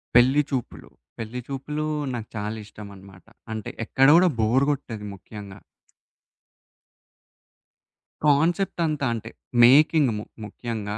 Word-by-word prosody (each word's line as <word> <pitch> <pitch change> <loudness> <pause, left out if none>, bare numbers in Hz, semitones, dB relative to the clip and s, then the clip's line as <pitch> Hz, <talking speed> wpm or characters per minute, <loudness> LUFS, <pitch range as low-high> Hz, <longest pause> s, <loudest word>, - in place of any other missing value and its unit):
'పెళ్లి 130 +4 +6
చూపులు', 130 -4 -5 0.3
'పెళ్లి 115 +2 -5
చూపులు' 150 +3 -4 0.3
నాకు 115 -3 -5
చాలా 105 +1 -3
ఇష్టమన్నమాట. 100 -2 -13 0.3
అంటే 110 -2 -5
ఎక్కడ 135 +4 +3
గూడా 180 +1 +6
బోర్ 120 +5 +3
గొట్టదు 115 -7 -5
ముఖ్యంగా. 100 0 -11 2.7
కాన్సెప్ట్ 165 +7 +2
అంతా 150 -3 -1
అంటే, 115 -1 -6 0.3
మేకింగ్ 145 +2 +6
ము 105 - -5 0.2
ముఖ్యంగా, 105 -1 -5
120 Hz, 105 wpm, -24 LUFS, 105-140 Hz, 2.7 s, పెళ్లి